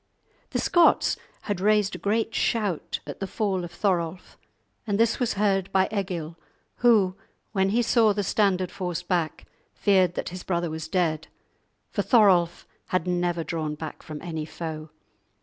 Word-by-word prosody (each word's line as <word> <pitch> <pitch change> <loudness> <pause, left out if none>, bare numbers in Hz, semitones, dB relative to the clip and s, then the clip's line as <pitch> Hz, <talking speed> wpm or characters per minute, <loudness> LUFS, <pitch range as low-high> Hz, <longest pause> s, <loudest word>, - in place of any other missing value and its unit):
The - - -2
Scots 345 -1 +4 0.3
had 200 -4 -3
raised 210 -1 +3
a - - -6
great 220 +2 0
shout 205 -8 -1
at 145 - -8
the 195 - -3
fall 190 -2 -1
of 175 - -7
Thorolf, 175 -2 -2 0.5
and 205 0 0
this 230 +2 +3
was 245 -3 +1
heard 195 -2 +1
by 190 0 +3
Egil, 170 -5 -3 0.4
who, 210 -6 +4 0.4
when 190 -2 +1
he 235 +4 +2
saw 225 -2 +4
the 205 0 -1
standard 190 -2 +1
forced 180 -3 -4
back, 170 -4 -1 0.3
feared 185 -4 +3
that - - -3
his 180 +1 -7
brother 170 -3 -1
was 160 0 -5
dead, 160 -2 0 0.6
for - - 0
Thorolf 185 -8 +4 0.2
had 185 -2 0
never 175 -1 0
drawn 155 -2 -3
back 155 0 -7
from 155 -1 -8
any 160 -3 -4
foe. 155 0 -6
185 Hz, 160 wpm, -26 LUFS, 170-205 Hz, 0.6 s, Scots